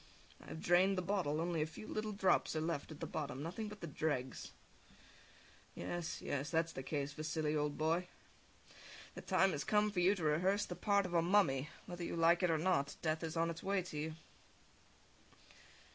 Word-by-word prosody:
I - - -15
have - - -6
drained 185 +2 +4
the 185 - 0
bottle, 175 -6 0
only 170 -1 0
a 155 - 0
few 160 - -10
little 215 0 -2
drops 195 -5 +2
are - - +1
left 160 -2 -2
at 155 -2 -9
the - - -1
bottom, 145 -2 -4
nothing 185 +7 -4
but 210 -1 -9
the - - -3
dregs. 145 -4 -2 1.3
Yes, 175 -1 -4
yes, 145 +1 -2
that's 165 0 +1
the 135 - -5
case, 145 +1 -3
Vasili, 155 0 -1
old 150 -1 0
boy. 165 +3 +1 1.1
The - - -7
time 190 0 +3
has 145 -4 -2
come 210 +3 +2
for 195 - -1
you 185 +3 +4
to 175 - -5
rehearse 180 +7 +2
the - - -6
part 200 -2 +2
of 180 - -5
a 170 - +4
mummy, 165 -6 +3 0.2
whether 175 0 -6
you - - -3
like 170 +2 +4
it 180 - +3
or 160 - +3
not. 155 -4 +1
Death 160 0 0
is 165 0 -3
on 165 0 +2
its 165 - -7
way 195 -1 0
to 170 -4 -7
you. 155 +1 -3
165 Hz, 200 wpm, -37 LUFS, 155-185 Hz, 1.3 s, drained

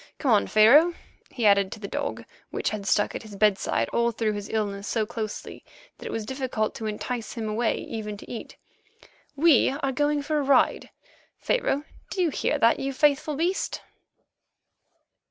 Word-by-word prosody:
Come 270 - 0
on, 210 - +4
Pharaoh," 285 +11 +6 0.3
he 240 -4 -3
added 200 -2 +4
to - - -10
the 200 - -6
dog, 285 +5 -4 0.2
which - - -2
had 205 -2 -5
stuck 205 +2 +2
at - - -5
his 215 -3 -11
bedside 205 -1 +1
all 235 0 +1
through 220 -1 -1
his 205 -1 -6
illness 205 -2 -2
so 220 -2 0
closely 220 -2 -6 0.4
that - - -7
it - - -5
was 225 -1 -3
difficult 260 -3 -2
to 220 - -5
entice 220 +2 -4
him 225 -2 -4
away 220 +2 0
even 210 -2 -6
to - - -12
eat; 235 - -8 0.8
"we 295 -2 +5
are 275 0 -2
going 290 +2 0
for 305 +1 0
a - - 0
ride, 270 -1 +2 0.5
Pharaoh; 295 - 0 0.3
do - - -5
you 345 -4 +2
hear - - 0
that, 230 - +3
you 275 0 -2
faithful 295 +2 +2
beast?" 345 +6 -1
235 Hz, 175 wpm, -26 LUFS, 215-280 Hz, 0.8 s, Pharaoh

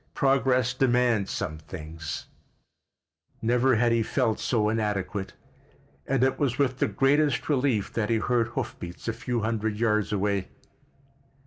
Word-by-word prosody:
Progress 130 -3 +2
demands 120 -5 +2
some 80 -6 -3
things——" 80 -2 -7 1.1
Never 125 +2 +3
had 120 +1 +3
he 115 0 +3
felt 110 0 0
so 110 -4 +1
inadequate, 105 -3 -2 0.7
and 135 -2 +2
it 135 - +1
was 130 -4 0
with 130 -2 +1
the - - +2
greatest 140 +7 +2
relief 130 -8 +1
that 110 -2 -1
he 115 - +3
heard 120 0 +1
hoof 120 - -4
beats 85 +4 -8
a 115 - 0
few 120 0 -2
hundred 110 -1 -1
yards 105 -3 +1
away. 100 -2 0
115 Hz, 140 wpm, -27 LUFS, 105-125 Hz, 1.1 s, Never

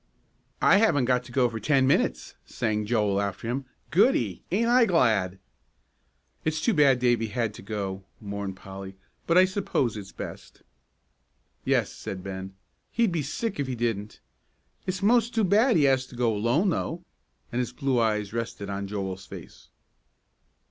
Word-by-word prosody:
"I - - +7
haven't 165 - +3
got 125 0 +2
to - - -12
go 130 -1 +3
for 115 -1 -5
ten 135 +3 +3
minutes," 60 - +1
sang 105 -3 -2
Joel 105 -3 +1
after 100 +3 -4
him. 130 +3 -2 0.3
"Goody, 160 - +3
ain't 220 +6 +2
I 240 0 +5
glad!" 110 - +2 1.1
"It's 155 0 0
too 235 - +2
bad 140 -6 +5
Davie 120 -2 +2
had 115 0 -2
to - - -11
go," 100 -2 -4 0.2
mourned 100 -2 -5
Polly; 95 0 -9 0.3
"but 170 - +4
I 185 - +8
suppose 185 - -1
it's 100 -2 -8
best." - - -9 1.0
"Yes," - - +1
said 95 -1 -7
Ben, 95 0 -6 0.4
"he'd 230 -4 +2
be 165 -2 0
sick 155 - -3
if 140 - -1
he 130 - -3
didn't. 110 -3 -3 0.7
It's 185 +1 -2
most 235 +2 +3
too 225 - +3
bad 215 +6 +4
he 155 - +4
has 135 -1 +3
to 125 - -13
go 120 -2 +1
alone, 120 - +2
though," 170 0 -2 0.5
and 120 - -1
his 125 - -1
blue 135 -4 0
eyes 105 -2 0
rested 115 -3 -4
on 100 0 -3
Joel's 95 -2 -5
face. - - -11
120 Hz, 165 wpm, -26 LUFS, 100-160 Hz, 1.1 s, I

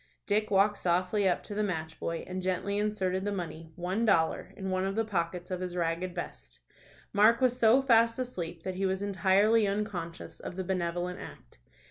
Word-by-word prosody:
Dick 215 +1 +1
walked 200 +1 +3
softly 185 +3 +2
up 175 - 0
to 210 - -7
the 210 - -1
match 160 -5 -3
boy, 165 0 -3
and 185 0 -4
gently 185 +2 -1
inserted 190 -3 0
the 205 - -1
money 165 -4 -5
one 185 +5 -1
dollar 165 -7 +2
in 190 -1 -3
one 185 0 0
of 195 +1 -1
the 225 0 +1
pockets 180 -3 -2
of 180 - -2
his 180 -1 -4
ragged 175 +1 -1
vest. 60 - -7 0.5
Mark 215 +3 +5
was 255 -1 +2
so 235 +4 +5
fast 230 -3 +4
asleep 175 -10 -5
that 185 - -3
he 190 +1 0
was 190 +1 -1
entirely 200 +3 +3
unconscious 195 -5 -4
of - - -7
the 190 - -3
benevolent 180 -1 -2
act. - - -12
190 Hz, 190 wpm, -30 LUFS, 175-210 Hz, 0.5 s, Mark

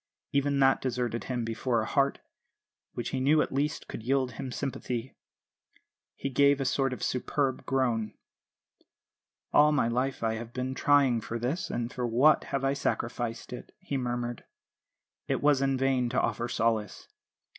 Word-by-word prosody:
Even 140 0 +1
that 135 0 +4
deserted 120 -2 -2
him 125 -3 -2
before 115 +1 0
a - - -3
heart, 140 +2 +1 0.7
which 120 - -3
he 135 - -2
knew 145 +4 +4
at - - 0
least 145 +2 -1
could - - -7
yield 130 +2 +1
him 130 +2 -6
sympathy. 125 -1 -4 1.0
He 135 - -4
gave 140 +2 +4
a 135 - -1
sort 135 0 +1
of 125 - -5
superb 130 +1 -1
groan. 120 -5 0 1.4
"'All 150 +1 +6
my 145 -6 +2
life 125 +2 -1
I 110 0 +1
have 115 +1 -8
been 130 0 -2
trying 135 -4 +3
for 115 - -4
this, 130 +9 -2
and 120 0 -3
for 125 -1 -2
what 130 +7 +4
have 135 -1 -2
I 135 - +2
sacrificed 120 -3 -3
it?' 125 - -9
he 185 -7 -5
murmured. 120 -2 -3 0.8
It - - -1
was 145 -2 +4
in 135 -1 +1
vain 130 -2 +1
to 125 - +1
offer 115 +1 -1
solace. 115 -4 -1
130 Hz, 165 wpm, -29 LUFS, 120-135 Hz, 1.4 s, All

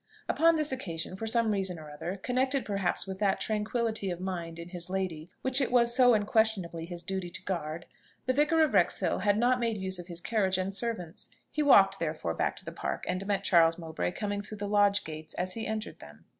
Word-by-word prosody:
Upon 330 0 +4
this 305 -2 0
occasion, 180 -9 -4
for 225 +4 -5
some 230 -1 +2
reason 190 -3 0
or 155 -2 -10
other, 170 +6 -5
connected 260 +5 0
perhaps 195 -3 0
with 190 -1 -6
that 200 -2 +2
tranquillity 220 -1 -1
of 175 -1 -3
mind 175 -3 -4
in 170 +1 -8
his 175 -1 -5
lady 180 -4 -3
which 260 +1 +2
it 260 - 0
was 235 -1 +4
so 250 -2 +6
unquestionably 205 -6 +1
his 175 -1 -6
duty 190 0 -3
to 175 - -8
guard, 170 -3 -3 0.4
the 255 - +2
Vicar 300 +4 +4
of 300 - +1
Wrexhill 180 -4 +2
had 205 -1 +2
not 245 +2 +3
made 230 -2 0
use 190 -1 -3
of 175 - -8
his 170 -2 -7
carriage 190 -1 0
and 190 +1 -2
servants. 195 -6 -5 0.2
He 305 - -1
walked 195 -9 +6
therefore 155 - -2
back - - -1
to - - -12
the - - -5
Park, - - -4
and 185 +2 -2
met 200 -1 0
Charles 165 -4 +5
Mowbray 165 +1 -3
coming 205 0 -2
through 210 +1 -9
the 205 0 -4
lodge 205 0 +3
gates, 155 0 -8
as 185 +1 -2
he 225 - -4
entered 220 0 -4
them. 75 +2 -14
195 Hz, 220 wpm, -30 LUFS, 175-225 Hz, 0.4 s, so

